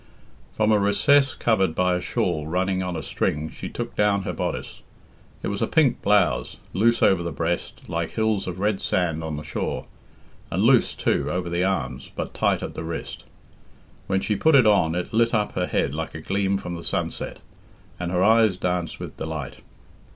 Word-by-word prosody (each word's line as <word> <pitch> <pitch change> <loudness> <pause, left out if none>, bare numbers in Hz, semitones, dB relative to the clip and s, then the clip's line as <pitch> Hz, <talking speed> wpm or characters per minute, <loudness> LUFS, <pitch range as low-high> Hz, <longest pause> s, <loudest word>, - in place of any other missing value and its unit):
From 110 0 +2
a 105 - +4
recess 135 +8 +4
covered 95 -8 +1
by 90 0 +2
a 90 - -1
shawl 75 -3 -1
running 95 +3 0
on 90 -1 -3
a 80 - -4
string 75 +1 -2
she - - -7
took - - -5
down 100 -1 +2
her - - -3
bodice. - - -4 0.6
It - - -1
was 100 0 -3
a - - +2
pink 145 -7 +2
blouse, 105 0 +2 0.2
loose 115 +5 +3
over 95 -3 +4
the 85 -1 -3
breast, 85 +1 -3
like 85 0 -2
hills 110 -3 0
of 90 -1 -4
red 100 +1 0
sand 85 -3 0
on 80 -2 -4
the 75 - -6
shore, 75 - -3 0.6
and - - 0
loose, - - +4
too, - - 0
over 90 -1 -2
the 85 +1 +1
arms, 65 -10 -2
but - - -4
tight - - +1
at - - -5
the - - -5
wrist. 80 0 -6 0.8
When 95 0 +1
she 105 - 0
put 160 +7 +4
it 130 -4 +7
on 100 -6 +4
it 90 +4 -3
lit 115 +1 +3
up 105 -1 +1
her 90 -1 -1
head - - 0
like 80 +1 -4
a 80 - -6
gleam 100 +3 0
from 90 -2 -6
the 85 -1 -6
sunset, - - -3 0.6
and 90 -1 -3
her 90 0 +2
eyes 110 -3 +4
danced 90 -2 -2
with - - -8
delight. 80 -4 -5
95 Hz, 195 wpm, -24 LUFS, 85-105 Hz, 0.8 s, it